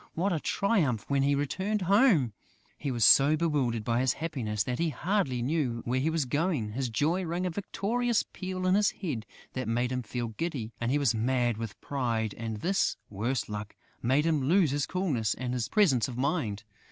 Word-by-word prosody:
What 180 +3 +1
a 160 - 0
triumph 155 - +1
when 140 -1 +2
he 140 +1 +3
returned 190 +9 -1
home!... 190 - +4 0.4
He 145 - -4
was 120 -4 +2
so 145 +3 +7
bewildered 140 -9 0
by 115 +2 +1
his 130 0 +2
happiness 120 -11 -2
that 125 +3 -3
he 170 0 +1
hardly 145 - -1
knew 130 -5 -1
where 125 +2 0
he 145 +5 +1
was 160 -3 0
going; 145 - 0
his 130 +2 -2
joy 160 +11 +1
rang 175 +2 -2
a 180 - -1
victorious 225 +6 0
peal 185 -1 -4
in 185 - +3
his 205 +1 +4
head 140 - -5 0.3
that 130 -2 -3
made 120 +2 0
him 125 0 -1
feel 120 0 -4
giddy; 120 -2 -4
he 125 +5 +2
was 140 -5 +2
mad 120 0 +1
with 115 -2 -6
pride; 115 -6 -1
and 110 -2 -5
this, 195 +2 +1
worse 115 +6 -1
luck, 105 0 -6 0.3
made 135 +6 +2
him 160 -3 +2
lose 165 +2 +3
his 145 0 -1
coolness 145 - 0
and 125 -1 -3
his 125 -2 -2
presence 150 - +3
of 125 - -7
mind! 130 - -1
135 Hz, 195 wpm, -29 LUFS, 120-170 Hz, 0.4 s, so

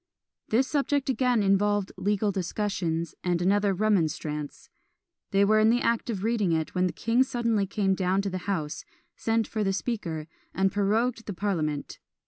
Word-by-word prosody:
This 250 +4 +3
subject 285 -1 0
again 250 -4 +2
involved 200 0 +2
legal 205 0 0
discussions, 180 -3 -2
and 175 -1 +1
another 200 +3 +2
"Remonstrance." 160 -7 -1 0.6
They 200 0 +3
were 215 +1 +4
in 215 +1 +5
the 240 +2 +3
act 230 +1 0
of 200 -4 -3
reading 220 -5 +1
it, 160 -1 -1
when 185 0 +2
the - - -2
king 230 +7 +1
suddenly 235 -6 +1
came 195 -1 +1
down 190 +1 +1
to 200 - -1
the 185 - -3
house, 155 -6 -2 0.3
sent 225 0 0
for 215 -2 -2
the 195 - +1
Speaker, 185 -7 -3 0.3
and 190 0 +2
prorogued 225 +4 0
the 205 - -3
parliament. 165 -7 -2
200 Hz, 165 wpm, -27 LUFS, 185-225 Hz, 0.6 s, in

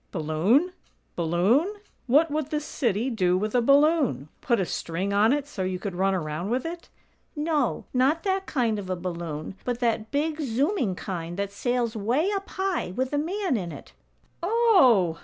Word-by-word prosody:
"Balloon? 190 - +2 0.4
Balloon? 195 - +2 0.3
What 295 +5 +4
would 305 -1 -2
this 300 -1 -2
city 235 -2 -1
do 185 -5 +2
with 210 +3 -2
a 245 - +3
balloon? 275 - +3
Put 235 -4 +1
a 190 - +1
string 180 +4 -3
on 210 +3 +4
it 285 0 0
so 255 -9 -7
you 185 0 -1
could 195 0 -5
run 190 +2 +1
around 160 +2 -3
with 250 +4 -1
it?" 335 +1 -6 0.5
"No; 300 -4 0
not 270 +6 +2
that 385 -1 -1
kind 230 -6 0
of 190 -2 -7
a 185 - 0
balloon, 170 -3 -5
but 245 -1 -2
that 225 -3 0
big, 310 +2 -1
zooming 265 - 0
kind 175 -2 -5
that 200 0 -2
sails 240 +2 -1
way 250 - +1
up 395 -1 -3
high, 380 - -2
with 260 +2 -2
a 290 - +2
man 370 0 -1
in 180 -6 -3
it." - - -11 0.5
"Oh! 340 - +4
240 Hz, 175 wpm, -26 LUFS, 185-300 Hz, 0.5 s, What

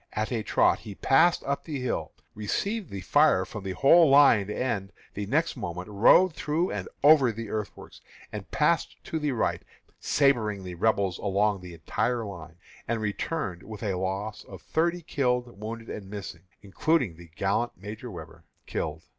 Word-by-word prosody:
At 110 +3 -2
a 115 -3 -1
trot - - +2
he 100 - -9
passed 165 - +3
up 140 0 -2
the 150 -4 -4
hill, 125 -1 -2 0.2
received 195 - -2
the 100 -1 -6
fire 140 -2 +4
from 105 0 -8
the 95 -1 -3
whole 160 - +6
line, 135 -8 +6
and 105 -4 -2 0.2
the 100 0 -4
next 155 +9 +1
moment 90 +3 -5
rode 135 - +5
through 155 +4 -1
and 95 -3 -4 0.2
over 145 -5 +7
the 115 -1 -7
earthworks, 105 -2 -6 0.3
and - - -6
passed - - +1
to 160 - -3
the 150 -2 0
right, 120 - 0 0.4
sabring 110 -9 +1
the 90 -1 -6
Rebels 95 -1 +1
along 100 0 +1
the 90 -1 -9
entire 115 +8 -1
line, 85 -5 -9 0.3
and 115 0 -1
returned 105 - -3
with 110 +2 -9
a 100 -3 0
loss 95 +3 -3
of - - -12
thirty 170 +2 0
killed, 125 -7 -1
wounded, 115 +1 -6
and 100 -2 -7
missing, 100 -4 -8 0.2
including 120 - 0
the 85 0 -14
gallant 100 +5 0
Major 105 +5 -8
Webber, 80 -4 -10 0.2
killed. - - -4
110 Hz, 170 wpm, -27 LUFS, 95-140 Hz, 0.4 s, over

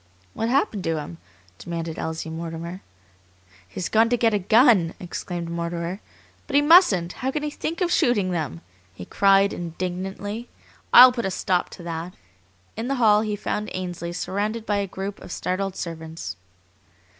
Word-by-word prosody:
"What 225 - -2
happened 235 -7 +1
to 165 -1 0
him?" 155 +3 -7 0.4
demanded 165 -1 -5
Elsie 160 0 -4
Mortimer. 165 +2 -6 0.9
"He's 170 - -4
gone 225 +1 +3
to 245 - +2
get 230 -1 +2
a 205 - +2
gun!" 210 - +4
exclaimed 175 -1 -5
Mortimer. 170 +2 -3 0.5
"But 280 - -3
he 285 - +6
mustn't! 290 - +5
How 260 - -3
can 295 +2 -2
he 300 - -2
think 330 +4 -4
of 350 -1 +1
shooting 205 - +2
them?" 150 - -3 0.3
he 90 - -8
cried 195 - +4
indignantly. 185 +6 -5 0.4
"I'll 255 +1 +10
put 240 -3 -3
a - - 0
stop 185 -1 0
to 175 - -11
that!" 170 +1 -5 0.6
In 225 +2 -4
the 275 - 0
hall 215 -4 +4
he 215 -1 -2
found 210 +1 -3
Ainsley 175 -2 -4
surrounded 210 +5 -3
by 205 -2 0
a 200 -1 -1
group 195 +2 -6
of - - -10
startled 190 +2 -2
servants. 160 - -6
190 Hz, 165 wpm, -24 LUFS, 170-225 Hz, 0.9 s, I'll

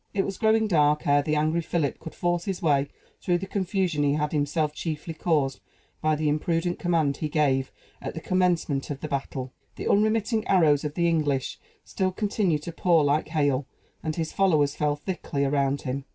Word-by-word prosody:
It 195 - +1
was 195 - -5
growing 220 0 +3
dark 150 -6 +2
ere 145 0 +4
the 155 +1 -1
angry 155 +3 +1
Philip 160 -3 -1
could 160 - -9
force 175 -1 -1
his 190 -3 -2
way 140 -3 +2 0.3
through 175 -1 +1
the 190 - -5
confusion 190 -5 -1
he 145 -1 +2
had 150 0 -1
himself 150 0 0
chiefly 160 +1 -4
caused 150 -5 0 0.4
by 155 0 +2
the 155 0 -1
imprudent 165 +4 0
command 160 -5 +1
he 155 - -3
gave 135 -3 +1 0.3
at - - -5
the - - -3
commencement 175 -6 0
of 140 -2 -5
the 155 - -3
battle. 135 -2 -4 0.2
The - - -5
unremitting 215 +1 +2
arrows 155 -6 +4
of 150 0 -4
the 170 -1 +2
English 145 -5 0 0.2
still 190 -1 -1
continued 190 -6 0
to 170 - -5
pour 170 -1 +3
like 145 +2 +1
hail; 145 -4 0 0.3
and 155 -1 -3
his 160 -2 -3
followers 155 -7 +2
fell 150 -1 +1
thickly 145 -3 -3
around 140 0 +1
him. 135 +1 -3
155 Hz, 190 wpm, -26 LUFS, 145-175 Hz, 0.4 s, ere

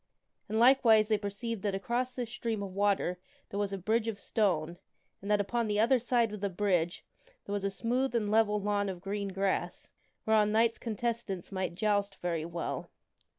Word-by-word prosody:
And, 220 - -1
likewise, 230 -3 +6
they 215 - +3
per 205 0 -3
ceived 230 +1 -4
that 200 -1 -1
across 245 +5 -1
this 245 -2 -3
stream 225 -3 -3
of 190 -2 -6
water 195 -2 +1 0.3
there 200 - -4
was 205 -1 0
a 195 - -2
bridge 220 +4 0
of 215 -3 -3
stone, 175 -6 0 0.4
and 200 - -7
that 210 -1 +4
upon 230 +3 0
the 210 0 0
other 245 +4 +4
side 235 -2 +1
of 210 - -5
the 200 - 0
bridge 180 -3 0 0.4
there 200 - -4
was 205 -1 -2
a 200 - +1
smooth 245 +5 -1
and 210 -3 0
level 215 -1 +3
lawn 205 0 0
of 185 -2 -5
green 200 +2 -3
grass, 195 0 -2 0.3
whereon 215 -1 +4
Knights 225 +1 +3
contestants 230 -5 -3
might 185 -2 -2
joust 205 -1 +1
very 170 -4 -2
well. 170 0 -4
205 Hz, 195 wpm, -31 LUFS, 195-230 Hz, 0.4 s, likewise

